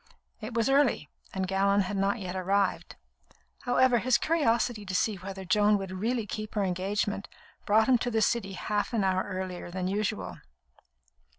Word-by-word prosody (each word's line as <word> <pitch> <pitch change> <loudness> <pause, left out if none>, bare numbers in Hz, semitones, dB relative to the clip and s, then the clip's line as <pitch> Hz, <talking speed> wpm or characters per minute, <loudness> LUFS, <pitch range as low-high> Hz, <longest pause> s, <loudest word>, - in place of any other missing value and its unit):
It 220 +1 -7
was 230 -1 +2
early, 270 - +2 0.2
and 190 -1 -2
Gallon 200 +1 +2
had 195 +1 -3
not 195 +2 +1
yet 185 -3 -5
arrived. 190 +1 0 0.7
However, 250 0 +4
his 250 +2 +3
curiosity 240 -8 +1
to 185 -2 -5
see 210 +1 +1
whether 190 +1 -7
Joan 210 +3 +3
would 195 -2 -6
really 225 +5 -1
keep 215 +2 -6
her 205 - +1
engagement 195 +2 -1 0.4
brought 220 +2 +4
him 255 -2 +4
to 245 - -1
the 220 -2 +1
City 205 -3 0
half 205 +4 -2
an 220 -4 +1
hour 185 -1 +2
earlier 185 -2 -5
than 180 +1 -3
usual. 210 +2 -2
205 Hz, 170 wpm, -28 LUFS, 190-225 Hz, 0.7 s, However